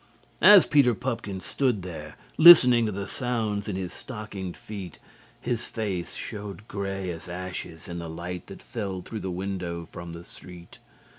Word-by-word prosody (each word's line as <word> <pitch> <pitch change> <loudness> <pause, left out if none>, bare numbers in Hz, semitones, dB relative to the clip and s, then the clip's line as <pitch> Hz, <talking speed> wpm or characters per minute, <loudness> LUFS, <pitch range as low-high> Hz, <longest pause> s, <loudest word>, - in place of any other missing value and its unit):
As 205 -3 +9
Peter 135 -6 +4
Pupkin 105 -6 -4
stood 120 -3 0
there 80 -4 -8 0.2
listening 125 -9 +9
to - - -1
the 100 0 -4
sounds 110 -4 -2
in 100 - -2
his 95 -2 -4
stockinged 105 -6 -7
feet, 100 -6 -8 0.4
his 120 -1 -2
faced 100 -6 -4
showed 105 0 -7
grey 95 -2 -3
as 85 +2 -8
ashes 90 -2 -6
in 85 0 -5
the 85 -1 -6
light 85 +2 -6
that - - -11
fell 100 -5 -4
through 110 - -6
the 95 - -4
window 90 -2 -4
from 85 -1 -8
the 85 0 -9
street. 90 -1 -13
95 Hz, 160 wpm, -26 LUFS, 90-110 Hz, 0.4 s, As